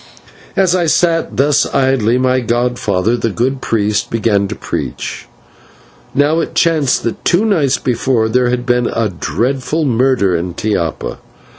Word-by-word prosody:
As 190 Hz, -2 st, +3 dB
I 175 Hz, -2 st, +1 dB
sat 165 Hz, +1 st, +1 dB
thus 145 Hz, +1 st, +3 dB
idly, 130 Hz, -3 st, +2 dB
my 130 Hz, 0 st, +2 dB
godfather, 120 Hz, -3 st, 0 dB
the 115 Hz, -1 st, -1 dB
good 130 Hz, +5 st, -1 dB
priest, 105 Hz, -1 st, 0 dB
began 105 Hz, -3 st, +1 dB
to -, -, -5 dB
preach. -, -, -5 dB, 0.9 s
Now, 145 Hz, +3 st, +2 dB
it -, -, -3 dB
chanced 155 Hz, -6 st, +2 dB
that 115 Hz, -, -4 dB
two 185 Hz, +5 st, +2 dB
nights 155 Hz, -11 st, +2 dB
before 120 Hz, -2 st, 0 dB
there 125 Hz, +2 st, +1 dB
had 125 Hz, 0 st, -2 dB
been 120 Hz, -1 st, +1 dB
a 115 Hz, -2 st, -1 dB
dreadful 130 Hz, -, -2 dB
murder 120 Hz, -7 st, +2 dB
in 85 Hz, +1 st, -3 dB
Tiapa. 90 Hz, -7 st, -2 dB
125 Hz, 145 wpm, -15 LUFS, 110-140 Hz, 0.9 s, As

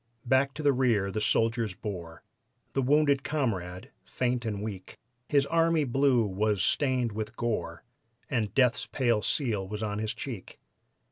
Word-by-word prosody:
Back 130 Hz, +2 st, +2 dB
to 155 Hz, -, -5 dB
the 145 Hz, -1 st, +4 dB
rear 115 Hz, -7 st, +2 dB
the 110 Hz, -, -2 dB
soldiers 115 Hz, -2 st, +1 dB
bore 90 Hz, -6 st, -7 dB, 0.5 s
The 135 Hz, -, +1 dB
wounded 140 Hz, +1 st, +3 dB
comrade, 105 Hz, -, -2 dB
faint 125 Hz, -1 st, -1 dB
and 105 Hz, -2 st, -3 dB
weak; 100 Hz, -4 st, -7 dB, 0.3 s
His 140 Hz, -2 st, +3 dB
"army 165 Hz, 0 st, +2 dB
blue" 130 Hz, -2 st, +3 dB
was 105 Hz, +1 st, 0 dB
stained 130 Hz, -5 st, +1 dB
with 110 Hz, +2 st, -5 dB
gore, 120 Hz, -2 st, -2 dB, 0.4 s
And 110 Hz, -6 st, -1 dB
death's 125 Hz, -3 st, +3 dB
pale 120 Hz, -5 st, +1 dB
seal 110 Hz, -, 0 dB
was 105 Hz, +2 st, -5 dB
on 105 Hz, -1 st, -2 dB
his 110 Hz, 0 st, -2 dB
cheek. 115 Hz, -9 st, -7 dB
115 Hz, 150 wpm, -28 LUFS, 105-135 Hz, 0.5 s, the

